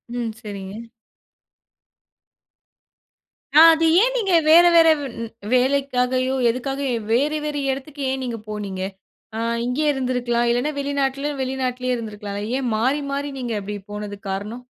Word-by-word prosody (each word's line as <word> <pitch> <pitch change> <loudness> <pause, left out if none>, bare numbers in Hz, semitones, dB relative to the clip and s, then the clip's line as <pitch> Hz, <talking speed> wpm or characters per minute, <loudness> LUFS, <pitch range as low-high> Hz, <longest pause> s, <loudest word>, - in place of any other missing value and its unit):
ம். 235 -2 -2
சரிங்க. 200 -3 -7 2.8
ஆ - - +9
அது 325 0 +1 0.2
ஏன் - - +2
நீங்க 390 -6 0
வேற, 330 +3 +8
வேற 330 -1 +7
வ் - - -5 0.2
ன் 230 - -5 0.2
வேலைக்காகையோ, 255 -1 +1
எதுக்காகயோ! 270 +1 -2
வேற, 280 +6 +2
வேற 300 -1 -3 0.2
இடத்துக்கு 275 +2 -7
ஏன் 265 0 -3
நீங்க 240 -2 -3
போனீங்க? 200 -3 -5 0.6
ஆ - - -2 0.3
இங்கே 255 +5 -1
இருந்திருக்கலாம். 245 -2 0
இல்லன்னா, 245 +6 0
வெளிநாட்லயோ, 280 0 -1
வெளிநாட்டிலேயே 255 -1 -2
இருந்திருக்கலா. 210 -3 -7 0.3
ஏன் 255 - -2
மாறி, 265 +6 +1
மாறி 285 +1 -3
நீங்க 240 -2 -3
அப்பிடி 205 +1 -6
போனதுக்கு 205 -1 -6
காரணம்? 210 +6 -5
255 Hz, 130 wpm, -22 LUFS, 230-280 Hz, 2.8 s, ஆ